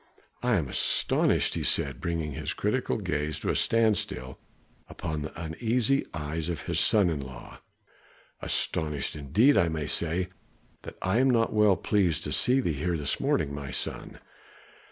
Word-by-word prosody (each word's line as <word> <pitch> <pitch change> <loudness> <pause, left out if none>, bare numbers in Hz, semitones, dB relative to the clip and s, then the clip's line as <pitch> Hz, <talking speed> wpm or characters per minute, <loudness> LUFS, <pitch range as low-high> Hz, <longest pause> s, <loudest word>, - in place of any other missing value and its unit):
"I 125 -1 +2
am 80 -8 0
astonished," - - +1
he - - -2
said, 70 -3 0
bringing 80 -3 -2
his 65 - -4
critical - - 0
gaze 75 0 -2
to - - -2
a - - -2
standstill 105 - +1 0.5
upon 80 -3 -4
the 75 +2 -7
uneasy 115 - 0
eyes 80 +1 -3
of 85 -4 -4
his - - -1
son 105 -4 +4
in 75 - -2
law, 65 -2 -10 0.8
"astonished, 75 -3 -1
indeed 80 - +3
I 85 - +3
may 80 -2 -3
say 85 +4 -1 0.5
that - - -9
I 95 +5 +2
am 135 +1 +4
not 115 -2 +2
well 105 -3 +4
pleased 90 -7 +1
to - - -3
see 125 +2 +3
thee 85 - 0
here 85 +4 -1
this 70 -2 -1
morning, 70 - 0
my 70 -2 -6
son. 65 - -5
80 Hz, 160 wpm, -28 LUFS, 75-105 Hz, 0.8 s, son